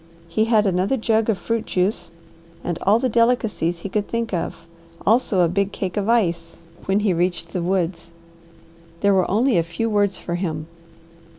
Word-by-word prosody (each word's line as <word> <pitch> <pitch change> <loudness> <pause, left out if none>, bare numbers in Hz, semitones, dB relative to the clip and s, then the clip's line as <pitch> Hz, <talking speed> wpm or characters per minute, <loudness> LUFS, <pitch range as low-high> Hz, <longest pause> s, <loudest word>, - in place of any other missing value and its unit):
He 215 +6 +1
had 220 -2 +3
another 190 +7 +1
jug 225 -1 +1
of 215 - +2
fruit 230 +4 -2
juice 180 -2 -1 0.5
and 175 -1 -3
all 205 +3 +4
the 255 - 0
delicacies 225 -8 +1
he - - -4
could 205 +1 -1
think 230 -2 -3
of, 170 -1 -3 0.4
also 220 -3 +3
a 175 - +4
big 200 +3 0
cake 190 -4 -4
of 205 +1 -1
ice, 170 -8 +1 0.3
when 195 +2 +1
he 205 -3 +2
reached 175 -1 -1
the 180 - -1
woods. 170 -2 -1 0.9
There 200 -1 +4
were 185 -2 +2
only 225 0 +3
a - - +4
few 175 +7 -3
words 205 -2 +1
for 170 - -5
him. 160 -4 -3
195 Hz, 180 wpm, -22 LUFS, 175-220 Hz, 0.9 s, all